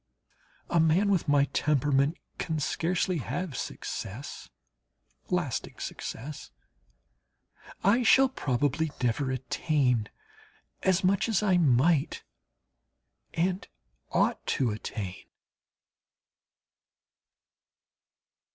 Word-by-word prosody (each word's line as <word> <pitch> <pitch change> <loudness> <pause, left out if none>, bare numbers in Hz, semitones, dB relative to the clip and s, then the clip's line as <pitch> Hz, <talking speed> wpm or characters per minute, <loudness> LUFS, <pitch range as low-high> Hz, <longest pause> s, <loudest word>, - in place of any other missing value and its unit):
A 170 - +4
man 165 +6 +4
with 185 -4 +1
my 145 -1 +4
temperament 145 +1 +2 0.2
can 160 -2 -1
scarcely 175 +4 0
have 170 +2 -4
success, 120 +4 -6 0.8
lasting - - -2
success. 140 +6 -6 1.3
I 220 +6 +4
shall 265 +3 +6
probably 145 - 0
never 125 +3 +1
attain 130 -3 0 0.7
as 190 0 +2
much 195 +4 +2
as 215 -2 +2
I 190 -3 +4
might 145 0 +3 1.1
and 180 +3 0 0.4
ought - - +1
to 125 -4 +1
attain. 105 -3 -5
155 Hz, 80 wpm, -28 LUFS, 130-185 Hz, 1.3 s, shall